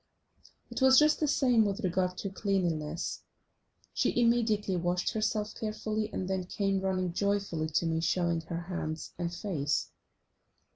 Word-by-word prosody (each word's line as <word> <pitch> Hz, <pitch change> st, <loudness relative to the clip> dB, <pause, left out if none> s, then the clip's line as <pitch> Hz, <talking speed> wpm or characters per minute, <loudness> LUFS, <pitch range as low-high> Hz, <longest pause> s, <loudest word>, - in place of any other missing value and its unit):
It -, -, -4 dB
was 265 Hz, 0 st, +7 dB
just 300 Hz, +1 st, +5 dB
the 305 Hz, -, +1 dB
same 250 Hz, -5 st, +4 dB
with 200 Hz, -2 st, -2 dB
regard 180 Hz, 0 st, 0 dB
to 195 Hz, -, -4 dB
cleanliness. 175 Hz, -5 st, -1 dB, 0.7 s
She -, -, +1 dB
immediately 225 Hz, -5 st, +2 dB
washed 175 Hz, +1 st, 0 dB
herself 215 Hz, -1 st, -1 dB
carefully, 215 Hz, 0 st, -3 dB
and 185 Hz, -, -3 dB
then 190 Hz, -1 st, -1 dB
came 195 Hz, 0 st, 0 dB
running 185 Hz, -2 st, -1 dB
joyfully 200 Hz, -5 st, 0 dB
to 160 Hz, +2 st, +1 dB
me 160 Hz, 0 st, 0 dB
showing 170 Hz, -1 st, +1 dB
her 165 Hz, +1 st, -5 dB
hands 170 Hz, -3 st, -5 dB
and 170 Hz, -1 st, -1 dB
face. 165 Hz, -6 st, -2 dB
190 Hz, 145 wpm, -30 LUFS, 170-215 Hz, 0.7 s, was